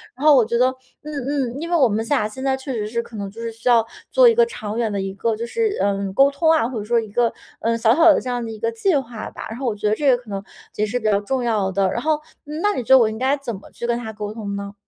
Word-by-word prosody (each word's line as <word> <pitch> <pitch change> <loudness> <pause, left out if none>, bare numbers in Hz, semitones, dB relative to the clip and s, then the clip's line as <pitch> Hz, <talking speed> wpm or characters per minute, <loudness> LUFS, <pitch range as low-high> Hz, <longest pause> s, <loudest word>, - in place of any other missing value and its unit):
然 270 +4 -5
后 305 -2 +8
我 250 - +6
觉 235 +2 -1
得， 250 +2 +4 0.3
嗯 300 0 -7 0.4
嗯， 280 - -6
因 335 - -4
为 345 - +3
我 270 -6 +5
们 220 +1 -1
俩 260 -6 +1
现 240 +5 -8
在 265 -1 +1
确 265 0 -6
实 210 -3 -2
是 235 +1 -2
可 230 - -13
能 200 -2 -4
就 215 +4 -13
是 230 0 -4
需 225 +2 -3
要 230 -2 +5 0.3
做 - - +6
一 465 - +6
个 475 +1 +5
长 215 - -6
远 230 -2 0
的 200 - -2
一 195 0 -3
个 220 +3 -1
就 230 +2 -4
是， 440 - -1
呃， 200 -1 0
沟 275 +6 +5
通 320 +3 +2
啊， 315 -8 +3
或 245 -3 -4
者 - - -5
说 235 +2 +2
一 220 -2 -5
个， 235 +2 +2 0.3
呃， 230 0 0
小 225 0 +4
小 330 0 +7
的 - - +3
这 - - -9
样 245 -1 -2
的 225 - -5
一 220 - -8
个 230 +2 -1
计 315 +10 +1
划 240 -5 -3
吧。 - - -8
然 225 - -6
后 270 - -2
我 225 - 0
觉 210 0 -2
得 210 - +2
这 285 +3 +2
个 250 - +5
可 240 -2 -15
能 195 0 -4 0.3
也 210 - +1
是 215 +4 -2
比 220 - -10
较 205 -2 +3
重 255 +4 -2
要 210 -5 0
的， 190 0 +1
然 235 - -2
后 310 +2 +1 0.3
那 320 +8 -1
你 250 - -2
觉 - - -18
得 - - +8
我 230 - +4
应 220 - -6
该 270 +3 +2
怎 245 -5 -5
么 195 - -13
去 - - -6
跟 235 0 0
他 225 -2 -6
沟 210 -1 -6
通 205 -3 -5
呢？ 200 0 -6
235 Hz, 350 characters per minute, -21 LUFS, 215-270 Hz, 0.4 s, 后